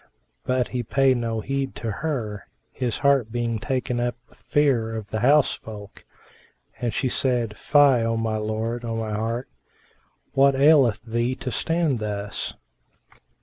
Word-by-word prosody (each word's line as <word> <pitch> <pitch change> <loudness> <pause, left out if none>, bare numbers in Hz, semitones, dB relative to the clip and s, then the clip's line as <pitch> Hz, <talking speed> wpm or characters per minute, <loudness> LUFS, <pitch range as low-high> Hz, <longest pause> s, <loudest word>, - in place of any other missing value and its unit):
But 130 -1 0
he 125 - -2
paid 130 +2 +2
no 115 -2 -2
heed 135 +2 -3
to 115 - -3
her, 110 - -4 0.2
his 125 -3 -2
heart 135 -6 +3
being 120 -1 -1
taken 125 -1 -2
up 120 0 -1
with - - -22
fear 125 -7 +1
of 105 -2 -7
the 110 - -1
house 140 +5 +4
folk; 105 -2 -10 0.7
and 120 -1 -1
she 130 +5 -1
said, 120 -4 0
"Fie, 140 -3 +4
O 115 0 0
my 110 -1 -1
lord, 110 +2 -3
O 115 -1 -3
my 110 -1 -3
heart! 115 +4 -2 0.9
What 135 0 +4
aileth 135 -6 +5
thee 120 +2 -1
to 130 - -5
stand 155 +3 0
thus?" 105 -1 -4
120 Hz, 150 wpm, -24 LUFS, 110-135 Hz, 0.9 s, aileth